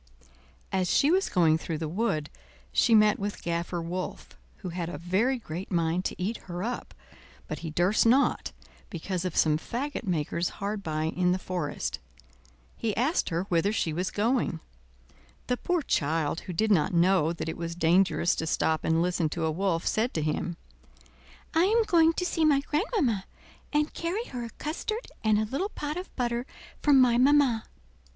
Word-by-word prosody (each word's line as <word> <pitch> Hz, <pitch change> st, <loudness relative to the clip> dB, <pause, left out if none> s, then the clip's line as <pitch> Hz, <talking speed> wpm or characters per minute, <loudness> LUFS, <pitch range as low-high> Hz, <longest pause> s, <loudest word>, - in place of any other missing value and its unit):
As 185 Hz, -2 st, 0 dB
she 290 Hz, -, +4 dB
was 380 Hz, +2 st, +2 dB
going 160 Hz, -3 st, +3 dB
through 160 Hz, -1 st, -4 dB
the 160 Hz, 0 st, -3 dB
wood 155 Hz, -4 st, -1 dB, 0.4 s
she 230 Hz, -, +4 dB
met 210 Hz, -1 st, +5 dB
with 205 Hz, +1 st, -4 dB
Gaffer 170 Hz, +1 st, -2 dB
Wolf, 175 Hz, +2 st, -5 dB, 0.3 s
who 185 Hz, -, -6 dB
had 170 Hz, -1 st, -4 dB
a 175 Hz, -, -5 dB
very 195 Hz, -, +1 dB
great 180 Hz, -5 st, -7 dB
mind 170 Hz, +1 st, 0 dB
to -, -, -3 dB
eat 205 Hz, +6 st, -1 dB
her 175 Hz, +1 st, -4 dB
up, 245 Hz, +3 st, -4 dB, 0.5 s
but -, -, -5 dB
he 165 Hz, -, -5 dB
durst 180 Hz, +8 st, +2 dB
not, 265 Hz, +4 st, +3 dB, 0.4 s
because 180 Hz, +1 st, -3 dB
of 180 Hz, -, -3 dB
some 155 Hz, -1 st, +3 dB
fagot 270 Hz, -, -4 dB
makers 170 Hz, -1 st, -1 dB
hard 200 Hz, +1 st, -3 dB
by 155 Hz, -4 st, -2 dB
in 180 Hz, +3 st, +1 dB
the -, -, 0 dB
forest. 180 Hz, -5 st, -3 dB, 0.8 s
He 220 Hz, -3 st, -2 dB
asked 275 Hz, +10 st, +1 dB
her 170 Hz, +1 st, -1 dB
whither 185 Hz, +1 st, +1 dB
she 165 Hz, -7 st, -1 dB
was 180 Hz, +4 st, -1 dB
going. 225 Hz, -5 st, 0 dB, 0.9 s
The 250 Hz, -, 0 dB
poor 350 Hz, +2 st, 0 dB
child, 155 Hz, -, 0 dB
who 185 Hz, -, -7 dB
did 215 Hz, +5 st, +1 dB
not 175 Hz, -2 st, +3 dB
know 170 Hz, -2 st, +4 dB
that 165 Hz, -, -5 dB
it 160 Hz, -, -3 dB
was 170 Hz, 0 st, -5 dB
dangerous 175 Hz, +1 st, +3 dB
to 160 Hz, -, -2 dB
stop 160 Hz, 0 st, +1 dB
and 165 Hz, +1 st, +2 dB
listen 175 Hz, -3 st, 0 dB
to 165 Hz, +1 st, -2 dB
a 160 Hz, -, +1 dB
wolf, 170 Hz, 0 st, -1 dB
said 230 Hz, +4 st, 0 dB
to 155 Hz, -, 0 dB
him: 165 Hz, +3 st, -2 dB, 1.0 s
"I 330 Hz, +2 st, +4 dB
am 450 Hz, +4 st, +3 dB
going 330 Hz, -5 st, +4 dB
to 360 Hz, -, -2 dB
see 335 Hz, -2 st, 0 dB
my 290 Hz, -3 st, +4 dB
grandmamma 295 Hz, -, 0 dB, 0.5 s
and 300 Hz, 0 st, +1 dB
carry 355 Hz, +7 st, -2 dB
her 245 Hz, -2 st, -5 dB
a -, -, -7 dB
custard 430 Hz, +9 st, -4 dB
and 215 Hz, -1 st, +3 dB
a 215 Hz, -, +1 dB
little 280 Hz, -, -2 dB
pot 300 Hz, -6 st, -4 dB
of 360 Hz, +2 st, -5 dB
butter 240 Hz, 0 st, -1 dB, 0.3 s
from 285 Hz, -3 st, +5 dB
my 245 Hz, -2 st, +5 dB
mamma." 265 Hz, -4 st, +4 dB
190 Hz, 180 wpm, -28 LUFS, 170-255 Hz, 1.0 s, met